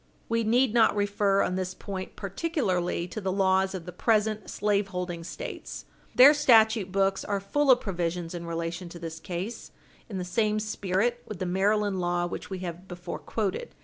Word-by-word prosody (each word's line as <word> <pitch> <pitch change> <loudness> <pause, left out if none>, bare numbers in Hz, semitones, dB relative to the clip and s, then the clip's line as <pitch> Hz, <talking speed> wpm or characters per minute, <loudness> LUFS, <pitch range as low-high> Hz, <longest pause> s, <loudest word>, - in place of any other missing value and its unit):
We 230 0 +1
need 235 +2 +3
not 230 -3 +4
refer 205 -1 +2
on - - -1
this 185 0 -3
point 190 -2 -6
particularly 195 - -1
to 215 - -6
the 190 -1 -1
laws 190 0 +2
of 175 -3 -6
the 180 - -6
present 215 +3 +1
slaveholding 190 -4 -1
States. - - -7 0.3
Their 265 +4 +9
statute 225 -8 +4
books 195 0 +1
are 200 -1 -1
full 285 +9 0
of 250 -1 +6
provisions 175 -3 -3
in 170 -1 -6
relation 170 +1 -4
to 170 - -9
this 165 -1 -7
class 180 +7 -5 0.4
in 200 - -4
the 180 - -3
same 215 +3 +1
spirit 215 +3 -1
with 215 - -6
the 185 - -3
Maryland 200 +2 +1
law 175 0 0
which 175 - -6
we 190 - -4
have 175 +2 -7
before 175 -1 -6
quoted. 220 - -3
195 Hz, 180 wpm, -27 LUFS, 180-215 Hz, 0.4 s, Their